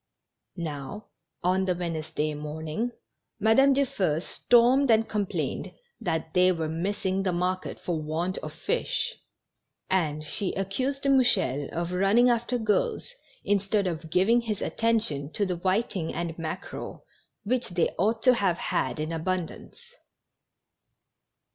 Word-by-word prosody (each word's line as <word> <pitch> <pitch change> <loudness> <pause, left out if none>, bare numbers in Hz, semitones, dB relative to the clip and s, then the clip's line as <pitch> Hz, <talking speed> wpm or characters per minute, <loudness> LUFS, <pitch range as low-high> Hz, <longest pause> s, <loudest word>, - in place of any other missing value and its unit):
Now, 165 +4 -6 0.3
on 185 +2 +2
the 180 -1 +1
Wednesday 160 -3 -2
morning, 155 +9 -4 0.5
Madame 270 +5 +5
Dufeu 195 - +1
stormed 245 +8 +3
and 225 0 +4
complained 205 -3 -2 0.3
that 160 -6 -2
they 180 0 +5
were 165 -3 -1
missing 190 +3 -1
the 190 -1 0
market 180 +1 -2
for 165 -3 -2
want 165 +5 -2
of - - -6
fish, - - -1 0.8
and 155 -5 +1
she 180 +5 -2
accused 255 +9 -2
Mouchel 220 - +3
of 170 +1 -3
running 200 +7 +4
after 240 +1 0
girls, 335 - 0 0.3
instead 200 0 +1
of 165 -2 -3
giving 205 +8 +4
his 215 -4 -3
attention 215 -11 0
to 205 - +1
the 180 -2 -2
whiting 185 -1 0
and 170 0 -3
mackerel, 165 +3 -6 0.4
which 250 +4 -1
they 175 -2 +1
ought 220 +4 +1
to 255 - +7
have 195 -7 +1
had - - -1
in 155 +1 -2
abundance. 175 - -3
185 Hz, 130 wpm, -27 LUFS, 165-225 Hz, 0.8 s, to